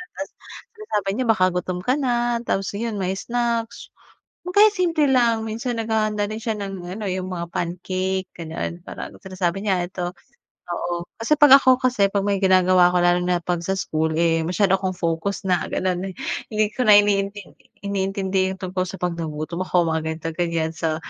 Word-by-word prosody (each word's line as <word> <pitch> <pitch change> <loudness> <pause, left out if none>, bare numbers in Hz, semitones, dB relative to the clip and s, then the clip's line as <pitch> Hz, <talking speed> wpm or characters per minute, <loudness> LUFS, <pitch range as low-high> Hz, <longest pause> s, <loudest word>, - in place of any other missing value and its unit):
Tapos 290 - -5 0.5
sinasabi 210 - -2
niya 255 - 0
baka 185 -5 +4
gutom 180 0 -2
ka 255 - +2
na. 240 -2 +1
Tapos, 195 -1 -1
ayun, 220 0 -3
may 185 0 0
snacks 235 +1 -2 0.6
o - - -3
kaya 420 +1 +7
simple 345 -5 +1
lang. 235 -4 +3
Minsan 230 +2 -3
naghahanda 215 -2 0
din 215 +2 -5
siya 220 -1 -2
ng 195 -2 -5
ano, 200 +4 -6
yung 185 -1 -2
mga 170 -1 -5
pancake, 185 +2 -2
ganun. 165 +1 -5
Parang - - -8
sinasabi 185 -1 -2
niya, 190 -4 +1
"Eto," 180 -1 -4 0.6
oo, 175 0 -3 0.2
kasi 265 +7 +3
'pag 280 -2 +9
ako 260 -1 +5
kasi, 245 -6 +2
'pag 200 -1 0
may 200 -1 +1
ginagawa 185 -1 +5
ako 180 - +2
lalo 175 0 +4
na 180 0 +1
'pag 175 -1 -1
sa 190 +3 -1
school, 160 -3 -1
eh, 165 0 +2
masyado 190 +2 +2
akong 185 -1 -3
focus 170 +4 -2
na 180 -2 +1
gano'n, 185 +1 -1
eh, - - -23 0.4
hindi 215 0 +2
ko - - -6
na 210 -1 +9
iniintindi 200 -1 -1
iniintindi 195 -1 -1
yung 190 - -17
tungkol 185 0 -1
sa 195 - -6
'pag 180 -1 0
nagutom 160 +2 -4
ako, 180 -2 +2
mga 160 0 0
ganito, 160 +1 -3
ganiyan. 165 -2 -1
So, 160 -1 -1
190 Hz, 185 wpm, -22 LUFS, 175-220 Hz, 0.6 s, pag